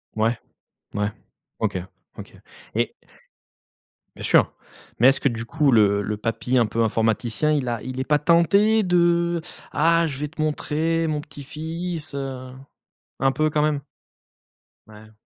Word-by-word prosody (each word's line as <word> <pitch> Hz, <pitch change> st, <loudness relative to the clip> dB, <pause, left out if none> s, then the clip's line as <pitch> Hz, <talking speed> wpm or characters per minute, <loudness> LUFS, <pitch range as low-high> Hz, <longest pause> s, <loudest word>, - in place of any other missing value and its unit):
Ouais? 110 Hz, +2 st, +1 dB, 0.6 s
Ouais. 105 Hz, +1 st, 0 dB, 0.5 s
OK, -, -, -1 dB, 0.4 s
OK. -, -, -10 dB, 0.4 s
Et -, -, 0 dB, 1.2 s
Bien -, -, -9 dB
sûr. -, -, +4 dB, 0.5 s
Mais 120 Hz, -, +7 dB
est-ce 135 Hz, -, +2 dB
que, -, -, +2 dB
du 115 Hz, -2 st, -4 dB
coup, 145 Hz, +2 st, +2 dB
le 100 Hz, -3 st, +4 dB
le 105 Hz, +1 st, -3 dB
papy 115 Hz, +4 st, -1 dB
un 115 Hz, -, +4 dB
peu 115 Hz, +2 st, 0 dB
informaticien, 115 Hz, +6 st, +1 dB
il 145 Hz, -4 st, 0 dB
a 120 Hz, -3 st, -2 dB
il 130 Hz, +1 st, -6 dB
est 130 Hz, -, -3 dB
pas 150 Hz, 0 st, +3 dB
tenté 200 Hz, +8 st, +4 dB
de: 170 Hz, -1 st, +2 dB, 0.3 s
«Ah, 165 Hz, 0 st, +3 dB
je 140 Hz, -3 st, -6 dB
vais 150 Hz, -, -2 dB
te 150 Hz, -, -19 dB
montrer, 160 Hz, +2 st, 0 dB
mon 155 Hz, -1 st, -1 dB
petit 145 Hz, -2 st, -11 dB
fils, 160 Hz, +1 st, -5 dB
heu...». 135 Hz, -2 st, -5 dB, 0.7 s
Un 135 Hz, +1 st, +3 dB
peu 155 Hz, +1 st, +1 dB
quand 150 Hz, 0 st, +1 dB
même? 150 Hz, -2 st, +1 dB, 1.1 s
Ouais. 110 Hz, 0 st, -15 dB
145 Hz, 155 wpm, -23 LUFS, 115-160 Hz, 1.2 s, Mais